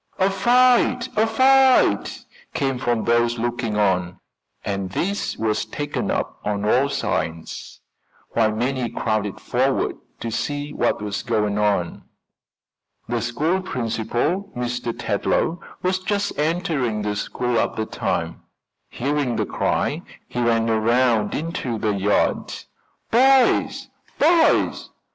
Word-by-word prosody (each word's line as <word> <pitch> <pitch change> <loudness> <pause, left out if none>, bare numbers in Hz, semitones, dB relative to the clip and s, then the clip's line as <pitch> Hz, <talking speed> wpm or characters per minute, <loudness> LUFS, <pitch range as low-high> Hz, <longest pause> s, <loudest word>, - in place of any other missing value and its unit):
"A 190 +1 +2
fight! 245 +4 +3
A 220 +1 +3
fight!" 260 +3 +3 0.3
came 135 -2 -1
from 120 -3 0
those 120 0 +2
looking 120 -2 -2
on, 90 -3 +1 0.5
and 100 -2 -2
this 195 - -2
was 110 -1 0
taken 145 0 -4
up - - -2
on 105 0 -2
all 130 +6 +3
sides, 85 -12 -4 0.5
while 110 -2 +2
many 125 +2 -1
crowded 110 -3 -2
forward - - 0 0.2
to 115 - -4
see 145 +5 -3
what - - 0
was 105 -1 -3
going 105 -3 0
on. 100 -5 0 1.0
The 120 0 -1
school 150 - 0
principal, 125 - -2
Mr. 120 -1 -2
Tetlow, 160 - -1 0.2
was 185 0 +1
just 205 +2 -1
entering 150 - -1
the 105 0 -2
school 120 +3 -1
at - - -1
the 110 - -2
time. - - -3 0.5
Hearing 140 -1 -1
the - - 0
cry - - -1 0.3
he 125 - -3
ran 115 -1 +2
around 115 -1 +2
into 145 -7 -3
the 105 -1 0
yard. 100 +1 +1 0.6
"Boys! 265 +2 +4 0.3
boys! 325 +2 +3
120 Hz, 120 wpm, -22 LUFS, 110-175 Hz, 1.0 s, Boys